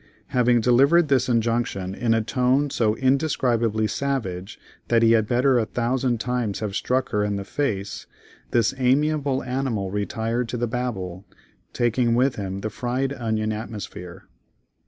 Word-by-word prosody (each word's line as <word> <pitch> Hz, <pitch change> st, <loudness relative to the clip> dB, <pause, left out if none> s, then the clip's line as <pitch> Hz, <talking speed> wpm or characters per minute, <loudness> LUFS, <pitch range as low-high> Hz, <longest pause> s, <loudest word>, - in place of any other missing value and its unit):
Having 120 Hz, -1 st, +3 dB
delivered 140 Hz, +8 st, +4 dB
this 130 Hz, -2 st, +2 dB
injunction 115 Hz, -5 st, 0 dB
in 115 Hz, +2 st, +1 dB
a 115 Hz, -, +1 dB
tone 130 Hz, +4 st, +1 dB
so 110 Hz, -4 st, +1 dB
indescribably 125 Hz, -5 st, +1 dB
savage 105 Hz, -8 st, -3 dB, 0.3 s
that 115 Hz, -1 st, +3 dB
he 115 Hz, -, +5 dB
had 110 Hz, -2 st, +3 dB
better 125 Hz, +1 st, +3 dB
a 110 Hz, -, 0 dB
thousand 120 Hz, 0 st, 0 dB
times 120 Hz, -4 st, -2 dB
have 105 Hz, -3 st, -4 dB
struck 130 Hz, +3 st, 0 dB
her 105 Hz, 0 st, 0 dB
in 105 Hz, 0 st, -1 dB
the 100 Hz, -, -3 dB
face, 105 Hz, -7 st, -3 dB, 0.4 s
this 115 Hz, -2 st, +2 dB
amiable 140 Hz, +1 st, +1 dB
animal 125 Hz, -7 st, -2 dB
retired 115 Hz, +4 st, -2 dB
to 125 Hz, -, -3 dB
the 120 Hz, -, 0 dB
Babel, 110 Hz, -7 st, -4 dB, 0.5 s
taking 120 Hz, 0 st, +1 dB
with 130 Hz, +2 st, +2 dB
him 95 Hz, -1 st, -4 dB
the 110 Hz, -, -3 dB
fried 130 Hz, +4 st, -2 dB
onion 110 Hz, -4 st, -1 dB
atmosphere. 100 Hz, -4 st, -7 dB
120 Hz, 150 wpm, -24 LUFS, 110-130 Hz, 0.5 s, he